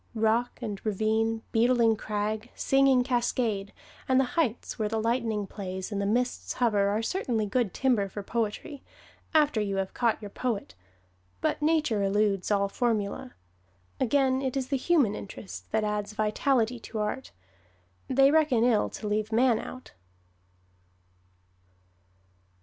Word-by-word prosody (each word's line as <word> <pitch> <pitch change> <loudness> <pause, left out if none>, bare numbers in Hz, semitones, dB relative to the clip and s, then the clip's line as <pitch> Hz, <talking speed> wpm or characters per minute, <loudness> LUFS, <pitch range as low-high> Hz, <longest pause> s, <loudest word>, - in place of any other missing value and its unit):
Rock 225 +2 +1
and 205 -4 -5
ravine, 220 +2 0
beetling 235 -1 +4
crag, 215 +2 -3
singing 270 -2 +3
cascade, 235 -5 -1 0.4
and 260 0 +5
the - - +4
heights 255 -11 -1
where 215 -1 0
the 220 +1 -1
lightning 225 -2 0
plays 190 -1 -6
and 200 -1 -1
the 200 - 0
mists 245 +4 -1
hover 210 -5 +2
are 215 +2 0
certainly 235 - -1
good 215 0 0
timber 235 -6 +1
for 205 +1 -6
poetry 230 +7 -3 0.5
after 295 -8 +4
you 200 -1 -1
have 195 -1 -2
caught 235 -2 +1
your 205 -2 -8
poet 220 - -3 0.7
but - - -1
Nature 300 -9 +2
eludes 195 -1 +1
all 200 -1 +2
formula. 205 - -2 0.6
Again, 265 +1 +2
it 265 0 -2
is 260 -1 -2
the 280 - +1
human 270 - +2
interest 195 -1 -8
that 220 0 +1
adds 210 0 -2
vitality 230 +3 +1
to 225 - -8
art 210 +5 -3 0.8
they 270 +1 +5
reckon 295 -7 +3
ill 235 -3 +3
to 215 - -6
leave 215 +1 -1
man 235 0 +3
out. 255 - -9
225 Hz, 140 wpm, -28 LUFS, 210-255 Hz, 0.8 s, and